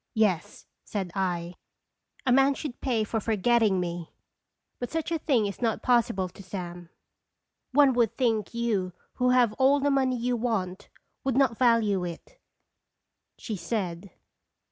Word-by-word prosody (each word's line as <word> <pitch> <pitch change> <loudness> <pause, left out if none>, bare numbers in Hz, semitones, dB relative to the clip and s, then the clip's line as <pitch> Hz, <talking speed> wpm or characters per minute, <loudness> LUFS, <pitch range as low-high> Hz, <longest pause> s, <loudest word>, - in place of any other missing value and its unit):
" - - -55
Yes," 205 -7 0 0.2
said 190 -4 -4
I. 175 -3 -2 0.7
"A 255 - +2
man 270 +2 +5
should 280 -5 -6
pay 240 -5 +1
for 220 +1 -2
for 220 +1 -1
getting 215 -2 +3
me. 175 -2 -4 0.7
But 245 - -4
such 325 +1 -3
a 330 - 0
thing 260 -8 +2
is 200 +2 -5
not 225 -2 0
possible 230 -7 +2
to 180 - -13
Sam." 175 -2 -7 0.8
"One 280 0 +5
would 235 -3 +1
think 225 -5 +1
you, 215 -6 -1 0.2
who 250 0 +2
have 250 -3 +4
all 275 +2 +5
the 285 +1 +1
money 260 -2 +2
you 245 +1 0
want, 210 -6 -2 0.3
would 265 -2 0
not 265 -4 +3
value 225 -6 +3
it," 180 - -8 1.0
she 220 - -5
said. 180 -1 -3
225 Hz, 155 wpm, -27 LUFS, 190-250 Hz, 1.0 s, man